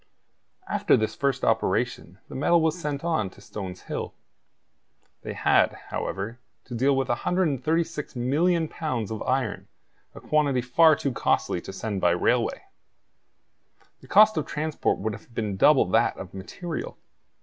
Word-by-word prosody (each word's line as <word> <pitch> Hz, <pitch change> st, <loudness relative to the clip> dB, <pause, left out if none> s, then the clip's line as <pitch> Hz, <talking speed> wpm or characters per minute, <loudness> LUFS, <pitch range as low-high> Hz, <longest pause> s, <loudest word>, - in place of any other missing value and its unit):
After -, -, +3 dB
this 110 Hz, 0 st, -1 dB
first 140 Hz, -2 st, -1 dB
operation, 110 Hz, -3 st, 0 dB
the -, -, -11 dB
metal 170 Hz, +5 st, +3 dB
was 160 Hz, -1 st, +1 dB
sent 150 Hz, -4 st, -4 dB
on 160 Hz, -, 0 dB
to 95 Hz, -, -18 dB
Stones 95 Hz, -2 st, -7 dB
Hill. -, -, -5 dB, 1.1 s
They -, -, -6 dB
had, -, -, +3 dB, 0.2 s
however, 105 Hz, +5 st, -4 dB, 0.3 s
to 125 Hz, -, -9 dB
deal 135 Hz, +4 st, +2 dB
with 135 Hz, -1 st, 0 dB
136,000,000 160 Hz, +1 st, 0 dB
pounds 130 Hz, -, -3 dB
of 110 Hz, -, -4 dB
iron, 130 Hz, -4 st, -1 dB, 0.5 s
a -, -, -8 dB
quantity 145 Hz, -4 st, +1 dB
far 155 Hz, +6 st, +5 dB
too 140 Hz, -, -2 dB
costly 90 Hz, -6 st, 0 dB
to -, -, -8 dB
send 100 Hz, 0 st, -4 dB
by 85 Hz, -, +4 dB
railway. 90 Hz, -, +1 dB, 1.4 s
The -, -, -17 dB
cost 215 Hz, +1 st, +6 dB
of 155 Hz, -, -1 dB
transport 155 Hz, +1 st, -1 dB
would 110 Hz, +2 st, -3 dB
have 110 Hz, -, -12 dB
been 105 Hz, -3 st, -2 dB
double -, -, +5 dB
that -, -, +2 dB
of 90 Hz, -, -9 dB
material. 155 Hz, -, -6 dB
130 Hz, 145 wpm, -26 LUFS, 110-155 Hz, 1.4 s, cost